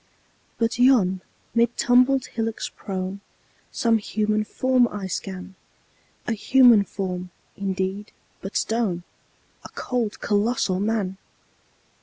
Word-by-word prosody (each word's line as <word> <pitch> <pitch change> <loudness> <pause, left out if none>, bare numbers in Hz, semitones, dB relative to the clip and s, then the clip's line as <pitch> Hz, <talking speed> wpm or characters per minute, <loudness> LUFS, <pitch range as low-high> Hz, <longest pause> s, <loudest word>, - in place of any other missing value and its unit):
But 230 +1 0
yon, 215 -8 +4 0.3
mid 235 0 +2
tumbled 255 +2 +4
hillocks 225 -1 -3
prone, 190 0 -5 0.5
Some 230 -1 +2
human 215 0 0
form 255 +1 +2
I 205 -4 -6
scan 190 0 -5 0.7
A - - -2
human 230 -1 +5
form, 180 -2 -4 0.3
indeed, 195 +1 -3 0.3
but 195 - -3
stone: 215 -7 -1 0.6
A - - -10
cold, 240 -4 -3
colossal 205 -3 +1
Man! 200 -2 -1
215 Hz, 105 wpm, -24 LUFS, 190-235 Hz, 0.7 s, human